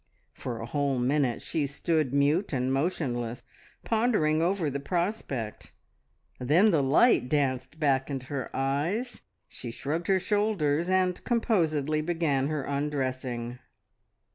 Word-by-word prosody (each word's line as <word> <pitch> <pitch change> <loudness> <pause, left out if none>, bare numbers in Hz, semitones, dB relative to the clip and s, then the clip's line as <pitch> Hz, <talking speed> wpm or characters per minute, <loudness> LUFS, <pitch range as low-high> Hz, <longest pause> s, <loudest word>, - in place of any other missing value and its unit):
For 120 -3 -5
a 115 - -5
whole, 140 +1 0
minute 130 0 +1
she 150 -3 -1
stood 150 0 0
mute 145 +7 +2
and 130 0 0
motionless, 125 -6 -2 0.4
pondering 215 -10 +2
over 175 -1 +1
the 140 0 -2
prospect; 155 - -3 0.7
then 165 - +4
the 160 -5 +3
light 135 - +4
danced 135 0 -1
back 135 -3 +2
into 135 -2 -4
her 130 -1 -4
eyes, 160 - -1 0.3
she 120 - -8
shrugged 150 +8 -3
her 190 -1 +3
shoulders, 185 -6 +1
and 185 -1 +1
composedly 160 - +1
began 155 -5 0
her 150 -2 -2
undressing. 130 -4 -3
145 Hz, 125 wpm, -28 LUFS, 130-175 Hz, 0.7 s, then